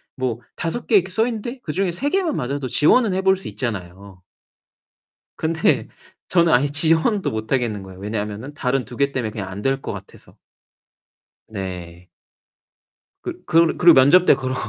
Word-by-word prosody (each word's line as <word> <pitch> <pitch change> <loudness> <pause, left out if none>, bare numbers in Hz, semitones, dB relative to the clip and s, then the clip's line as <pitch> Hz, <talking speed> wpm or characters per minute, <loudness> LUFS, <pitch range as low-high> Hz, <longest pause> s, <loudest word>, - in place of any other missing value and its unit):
뭐 125 -3 -2 0.2
5 175 +8 -3
개 220 - +3
이렇게 190 -1 +3
써 220 +4 +2
있는데 240 +2 -5
그중에 180 +4 -1
3 275 +12 -1
개만 365 -5 0
맞아도 135 +1 -3
지원은 200 - +3
해 190 - 0
볼 190 0 +4
수 190 - -8
있잖아요. 95 -5 -6 1.2
근데 160 -7 +1 0.4
저는 170 -2 +3
아예 135 +4 +4
지원도 160 +7 +2
못 110 +1 -5
하겠는 115 -6 -1
거예요. 95 -1 -12
왜냐하면은 105 +6 -5
다른 125 -2 -1
2 120 - -10
개 140 0 +1
때문에 120 -5 -3
그냥 100 -3 -6
안 95 +2 -7
될 135 +3 0
것 - - -5
같아서. - - -12 1.1
네. 90 -4 -7 1.2
그 - - -7
그르 165 0 +3
그리고 170 -2 +7
면접 145 +8 +6
때 - - +7
그러 130 -1 -3
135 Hz, 300 characters per minute, -21 LUFS, 110-175 Hz, 1.2 s, 그리고